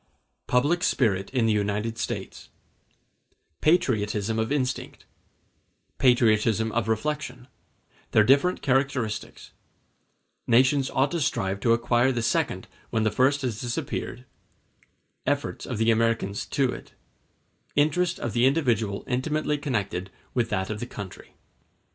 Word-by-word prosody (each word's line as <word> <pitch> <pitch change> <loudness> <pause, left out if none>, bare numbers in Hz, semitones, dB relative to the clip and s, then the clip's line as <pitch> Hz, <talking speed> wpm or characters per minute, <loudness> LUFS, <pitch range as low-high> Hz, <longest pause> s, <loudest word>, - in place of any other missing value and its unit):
Public 145 +8 +2
Spirit 100 - +1
In 125 -3 +1
The 110 - +3
United 105 +2 -1
States - - -5 1.1
Patriotism 110 - +1
of 110 +3 -1
instinct—Patriotism 120 -4 -1
of 115 -1 -1
reflection—Their 125 -3 -3
different 140 +10 +3
characteristics—Nations 130 0 -1
ought 135 +2 +1
to 170 -2 -1
strive 95 -6 -1
to 115 +3 +3
acquire 120 +2 +2
the 120 -3 -2
second - - 0 0.2
when 110 - 0
the 110 - +2
first 140 +2 +2
has 115 -5 -2
disappeared—Efforts 130 +3 -6
of 120 - -3
the 115 +1 +3
Americans 115 -3 0
to 135 -3 +1
it—Interest 170 +5 -3
of 120 - -3
the 120 +3 +4
individual 115 -9 +1
intimately 150 +3 -1
connected 105 - -2 0.2
with 120 -2 0
that 95 -1 -1
of 105 - -4
the 120 - -5
country. 100 -6 -9
120 Hz, 110 wpm, -26 LUFS, 110-135 Hz, 1.1 s, the